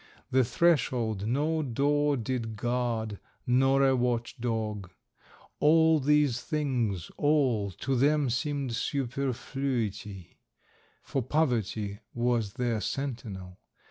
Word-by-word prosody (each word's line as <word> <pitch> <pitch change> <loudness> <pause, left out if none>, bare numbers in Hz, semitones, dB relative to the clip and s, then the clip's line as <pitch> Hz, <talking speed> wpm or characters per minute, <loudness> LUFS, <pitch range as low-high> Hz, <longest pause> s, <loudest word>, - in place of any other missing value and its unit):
The 130 0 +4
threshold 120 - +1
no 150 +6 +1
door 145 +2 +1
did 115 -2 -3
guard 115 -2 -2 0.3
nor 135 +2 +3
a 135 - +3
watch 120 -2 -1
dog; 110 -5 -2 0.7
all 160 +1 +5
these 145 -3 +2
things, 125 - -1
all, 135 -9 +2
to 130 +8 -2
them 140 +1 +2
seemed 135 +1 -2
superfluity, 125 - -3 0.6
for 135 - -2
Poverty 115 -7 -1 0.2
was 120 -4 0
their 120 -4 -1
sentinel. 105 -8 -5
125 Hz, 100 wpm, -29 LUFS, 110-140 Hz, 0.7 s, all